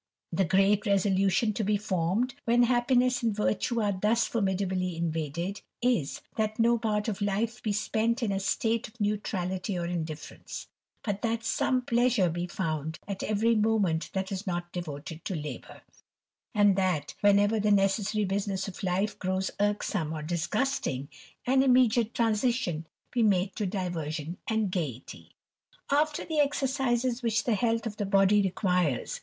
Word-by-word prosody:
The 185 +3 +1
great 195 +3 +3
resolution 195 +2 +2
to 215 - -2
be 210 +1 +2
formed, 200 +5 0
when 240 +1 +4
happiness 250 0 +2
ai 230 - +3
virtue 215 +2 0
are 205 - +2
thus 225 +3 +3
formidably 190 -4 -1
invaded, 165 +3 -2 0.2
is, 235 - 0 0.2
that 215 -1 0
no 235 +1 +3
part 210 -1 0
of 215 -2 -3
li 205 +3 +1
be 215 - -1
spent 220 +3 0
in 215 - 0
a 195 - 0
state 225 +3 0
of 225 +2 -20
neutrality 195 -2 -1
or 170 - -2
indifference; 160 -3 -5 0.4
but 205 -2 -2
tb 230 0 -1
some 255 +2 +1
pleasure 240 -7 +2
be 175 +2 -3
found 160 -3 -3
for 200 - -2
every 215 +2 +2
moment 210 -7 +1
that 190 0 -2
is 195 +2 -4
ni 175 -1 0
devoted 160 -1 -6
to 190 - -3
labour; 150 -5 -7 0.7
and 205 -2 +5
that, 180 -7 0
whenever 205 +2 +4
the 210 0 +1
necessoi 200 +1 +2
business 195 0 -1
of 195 - -8
life 190 +3 -1
grows 185 0 -1
irksome 205 -5 0
or 155 -1 -5
disgusting, 170 - -1 0.4
an 265 +1 +4
immediaB 245 -3 +4
transition 225 -7 0 0.2
be 245 - +1
made 195 -3 +2
to 210 - -1
diversion 170 -4 -3
and 220 -3 0
gaiety. 145 - -5 0.6
After 295 +1 +1
the 315 -2 -1
exercises 265 -3 +1
which 220 -3 +1
the 240 - +1
health 225 +2 +1
of 210 -2 -4
the 205 - -1
body 195 +1 +4
requires! 180 - 0
205 Hz, 155 wpm, -28 LUFS, 180-230 Hz, 0.7 s, and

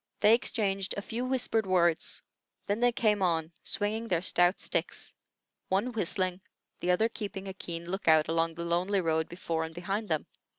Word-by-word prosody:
They 215 - +7
exchanged 195 -5 +1
a - - -1
few 235 +4 -3
whispered 245 -5 0
words; 175 -3 +2 0.4
then 205 +2 -1
they 245 0 +4
came 215 -3 +1
on, 165 -3 +1
swinging 220 +2 -1
their 175 -4 +1
stout 175 0 +3
sticks, - - -2 0.6
one 200 +7 +1
whistling, 185 -3 0 0.4
the 175 - -2
other 180 +5 +4
keeping 200 -4 -6
a 190 - -5
keen 170 -2 -6
lookout 160 -4 +3
along 165 0 0
the 170 +1 -4
lonely 180 +4 +1
road 160 -1 0
before 165 -2 -2
and 160 0 -7
behind 195 +5 -3
them. 155 -2 0
185 Hz, 170 wpm, -30 LUFS, 170-210 Hz, 0.6 s, They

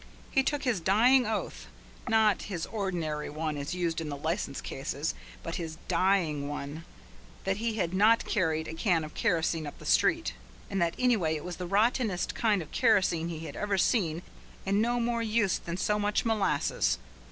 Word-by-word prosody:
He 270 - +4
took 290 +2 -1
his 245 -8 +1
dying 235 +8 +4
oath, 175 - -3 0.4
not 220 -2 +4
his 175 -5 -3
ordinary 170 -8 -3
one 155 0 -3
as 145 +4 -4
used 170 -2 -1
in 155 - -4
the 145 - -4
License 160 -1 -2
cases, 140 +3 -3 0.3
but 165 - -4
his 160 -2 -5
dying 170 -5 +1
one, 145 +2 -6 0.6
that 195 0 0
he 225 0 -1
had 180 -5 -1
not 215 +4 +4
carried 160 -6 0
a - - -5
can 165 -1 +1
of 155 - -8
kerosene 165 -2 0
up 145 - -8
the - - -13
street, - - +2 0.4
and 195 -2 0
that 170 0 +1
anyway 215 -11 +2
it 150 - -5
was 180 -1 -5
the 180 - -4
rottenest 210 -1 +1
kind 210 -6 +1
of 150 - -16
kerosene 190 -8 +2
he 160 -2 -5
had - - -7
ever 205 -1 -1
seen 175 -4 +1 0.4
and 200 +2 +2
no 240 +2 +1
more 235 0 0
use 215 -3 +1
than 170 +1 -5
so 210 +2 +1
much 205 +2 0
molasses. 220 -3 +1
180 Hz, 185 wpm, -29 LUFS, 160-215 Hz, 0.6 s, He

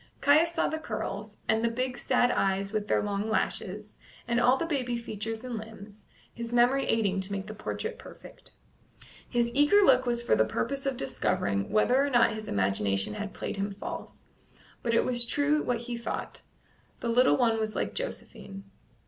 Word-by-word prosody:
Caius 310 +4 +4
saw - - +1
the 315 - -3
curls, 210 -5 -5
and 220 +1 +2
the 235 - +3
big 255 +2 -2
sad 245 -1 +2
eyes 195 0 0
with 210 -1 -1
their - - +2
long 205 +1 -2
lashes, 210 -1 -3 0.3
and 235 0 +1
all 250 +2 +4
the 335 - -2
baby 255 -7 -1
features 225 0 -5
and 245 -3 -4
limbs, 215 -1 -12 0.3
his 235 0 -6
memory 245 +3 +3
aiding 200 -4 +1
to 190 +1 -2
make 195 -1 -3
the 215 - -7
portrait 450 - -5
perfect. - - -13 0.8
His 235 -1 +1
eager 295 +10 +5
look 260 -5 +5
was 235 0 0
for - - +3
the 110 - +4
purpose 275 - -2
of 265 -2 -1
discovering 100 - -1
whether 250 +5 +3
or 285 - 0
not 240 -3 +4
his 215 -1 -7
imagination 100 0 +1
had 210 -1 -6
played - - -4
him 200 0 -3
false; - - -8 0.6
but 230 -1 0
it - - +3
was 240 -1 +2
true 290 +5 +1
what 240 -2 -1
he 240 0 -6
had 235 0 -6
thought - - -5 0.6
the - - -4
little 245 +2 +4
one 230 -3 +2
was 215 -1 -2
like - - -2
Josephine. 195 - -6
230 Hz, 190 wpm, -28 LUFS, 205-255 Hz, 0.8 s, eager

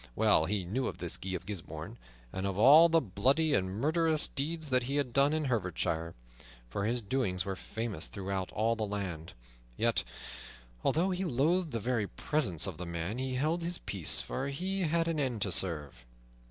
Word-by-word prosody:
Well - - +4
he 100 -1 -1
knew 125 +9 -1
of - - -5
this - - 0
Guy 95 0 -4
of 90 - -6
Gisbourne, 90 - -6 0.3
and 95 +1 -2
of 95 -1 -3
all 150 +9 +8
the 165 0 +5
bloody 135 - +2
and 95 -6 +2
murderous 155 - +1
deeds 155 +2 -4
that 130 -1 +4
he 135 +3 -3
had 140 -4 0
done 140 +1 +4
in 155 -1 0
Herefordshire, 90 -8 -1 0.5
for 100 +12 -3
his 120 +1 0
doings 100 -6 -1
were 95 -1 -2
famous 110 -3 -3
throughout 95 -1 -4
all 115 +2 +1
the 115 - -6
land. 95 -6 -4 0.4
Yet, - - +2 0.8
although 180 +5 +2
he 185 +1 -1
loathed 165 +4 +1
the 115 -4 -2
very 115 -1 0
presence 100 - 0
of 95 -5 -5
the 90 +1 -6
man, 85 +7 -3
he 130 0 -2
held 155 +6 0
his 170 +1 -2
peace, 95 -6 0
for 135 +2 -3
he 185 +8 -2
had 165 0 +1
an 165 -2 0
end 125 -7 0
to 100 - -1
serve. 75 -9 -1
120 Hz, 190 wpm, -31 LUFS, 95-150 Hz, 0.8 s, all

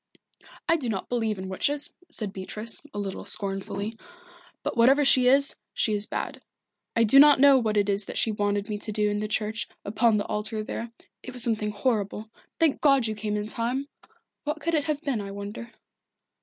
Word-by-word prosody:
"I 330 0 +4
do 260 -7 -4
not 195 -4 -3
believe 225 -4 -1
in 190 0 -6
witches," 280 +10 0 0.2
said 215 -10 -3
Beatrice, 210 +4 -4
a - - -8
little 195 -2 -4
scornfully. 200 +2 -3 0.6
"But - - -2
whatever 270 +5 +5
she 255 -2 +6
is, 275 +2 +4 0.2
she 215 - +1
is 205 0 -1
bad. - - -4 0.5
I 230 - +4
do 230 +5 +6
not 290 -1 +8
know 275 -1 +7
what 215 -3 0
it 205 -1 +2
was 200 0 +1
that - - -6
she 225 - +2
wanted 205 -1 -1
me 210 -2 -4
to 215 - -5
do 210 0 +1
in 205 - -1
the 215 - -2
church, 215 +1 -2 0.2
upon 220 +2 +2
the 205 - -1
altar 215 +1 -3
there 230 +2 -5 0.3
it 255 - -8
was 250 -2 +1
something 215 -3 +1
horrible. 210 -1 -2 0.3
Thank 320 -4 +2
God 275 -4 +4
you 220 - -1
came 210 0 -3
in 210 - -2
time! 245 +6 -2 0.5
What 300 +1 -3
could 335 +2 -2
it 300 -3 +1
have 305 -1 -2
been, 265 -8 -1
I 200 - -6
wonder?" 200 +4 -7
220 Hz, 200 wpm, -26 LUFS, 205-260 Hz, 0.6 s, not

